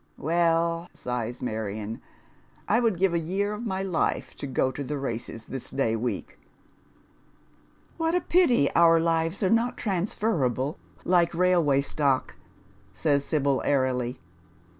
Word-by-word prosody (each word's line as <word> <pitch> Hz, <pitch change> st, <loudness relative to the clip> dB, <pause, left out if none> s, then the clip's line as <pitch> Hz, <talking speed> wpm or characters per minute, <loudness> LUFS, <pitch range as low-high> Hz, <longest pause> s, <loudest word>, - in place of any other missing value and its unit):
Well," 165 Hz, +1 st, +1 dB
si.o 125 Hz, -2 st, -3 dB
lis 120 Hz, +2 st, -8 dB
Marion, 110 Hz, -1 st, -4 dB, 0.3 s
" -, -, -33 dB, 0.3 s
I 225 Hz, -, +3 dB
would 225 Hz, -6 st, +1 dB
give 190 Hz, 0 st, +2 dB
a 170 Hz, -, +2 dB
year 195 Hz, +5 st, -1 dB
of 230 Hz, +3 st, -5 dB
my 190 Hz, -1 st, -2 dB
life 185 Hz, -4 st, -1 dB
to 140 Hz, -, -5 dB
go 130 Hz, 0 st, +1 dB
to 140 Hz, -, -5 dB
the 145 Hz, +2 st, -3 dB
races 115 Hz, -4 st, -4 dB
this 135 Hz, -2 st, -6 dB
day 115 Hz, -5 st, 0 dB
week." 120 Hz, +2 st, -4 dB, 0.8 s
" -, -, -34 dB
What 325 Hz, +1 st, +1 dB
a 360 Hz, -, +2 dB
pity 295 Hz, -, +3 dB
our 165 Hz, -1 st, +6 dB
lives 165 Hz, +3 st, 0 dB
are 190 Hz, -, +3 dB
not 230 Hz, +2 st, +2 dB
transferable 170 Hz, -, -1 dB, 0.3 s
like 175 Hz, -1 st, +3 dB
railway 170 Hz, -6 st, +3 dB
stock," 140 Hz, -2 st, 0 dB, 0.6 s
says 145 Hz, -3 st, +1 dB
Sibyi, 140 Hz, -3 st, +1 dB
airily. 130 Hz, -4 st, 0 dB
165 Hz, 145 wpm, -26 LUFS, 130-185 Hz, 0.8 s, our